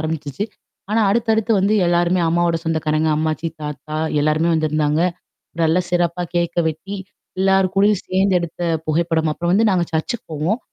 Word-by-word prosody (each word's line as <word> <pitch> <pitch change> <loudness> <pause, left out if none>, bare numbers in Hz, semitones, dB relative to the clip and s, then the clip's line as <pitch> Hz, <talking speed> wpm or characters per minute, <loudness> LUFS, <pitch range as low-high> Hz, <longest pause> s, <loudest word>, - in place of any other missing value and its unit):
ஆரம்பிச்சுச்சு. 155 +1 -3 0.5
ஆனா, 225 +1 +2
அடுத்தடுத்து 225 0 +1
வந்து 205 +3 +2
எல்லாருமே 175 +1 +2
அம்மாவோட 170 0 +2
சொந்தக்காரங்க, 160 -1 0
அம்மாச்சி, 155 +1 -1
தாத்தா 150 +1 -5 0.2
எல்லாருமே 155 +3 +2
வந்திருந்தாங்க. 155 -1 +1 0.6
நல்ல 160 +1 +3
சிறப்பா 175 0 0
கேக்க 170 0 0
வெட்டி, 160 +6 -5 0.4
எல்லார் 190 -1 +3
கூடயும் 200 0 +3
சேர்ந்து 190 0 +2
எடுத்த 170 0 -6 0.3
புகைப்படம். 160 0 +1
அப்புறம் 170 +2 -1
வந்து 220 +2 +4
நாங்க 180 -2 +2
சர்ச்சுக்கு 160 +8 -2
போவோம். 165 - -1
170 Hz, 140 wpm, -20 LUFS, 155-190 Hz, 0.6 s, வந்து